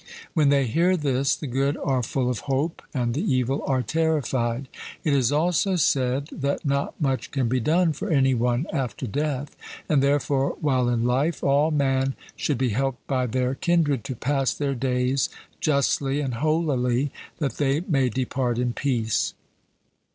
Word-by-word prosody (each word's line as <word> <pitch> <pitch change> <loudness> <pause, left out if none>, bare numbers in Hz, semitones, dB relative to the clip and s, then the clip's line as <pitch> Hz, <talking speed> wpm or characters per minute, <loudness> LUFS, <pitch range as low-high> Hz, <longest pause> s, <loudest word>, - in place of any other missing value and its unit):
When 150 -5 +3
they 140 -1 +3
hear 175 +10 +2
this, 140 -3 +1
the - - -7
good 135 +2 0
are 130 -2 0
full 125 +2 -1
of 125 -4 -1
hope, 140 +5 -1
and 120 -4 -1
the 145 - -1
evil 135 - 0
are 130 -2 +1
terrified. 135 -3 0 0.4
It 150 - +1
is 130 -2 +3
also 175 +5 +2
said 135 -4 +1
that 140 0 -2
not 140 0 -1
much 135 -5 -1
can 135 -4 0
be 130 +2 +1
done 165 +6 +2
for 200 +8 -5
any 135 -4 +3
one 120 +3 +1
after 135 -3 -2
death. 145 +3 -2 0.3
And 145 -3 +3
therefore 140 -1 +1
while 130 -4 +1
in 120 -1 +1
life 135 +7 0
all 140 +3 +3
man 135 -3 +1 0.2
should 145 - -1
be 130 0 +1
helped 135 +3 -2
by 130 -2 0
their 125 +2 0
kindred 150 - +1
to 130 - -4
pass 135 +2 0
their 140 -2 -1
days 130 +1 0 0.3
justly 140 -1 +1
and 135 -4 -2
holily, 140 -2 +1 0.3
that 140 -3 -2
they 145 +1 +1
may 135 -8 +1
depart 125 0 -1
in 125 -1 0
peace. 115 -5 0
135 Hz, 165 wpm, -24 LUFS, 125-145 Hz, 0.4 s, When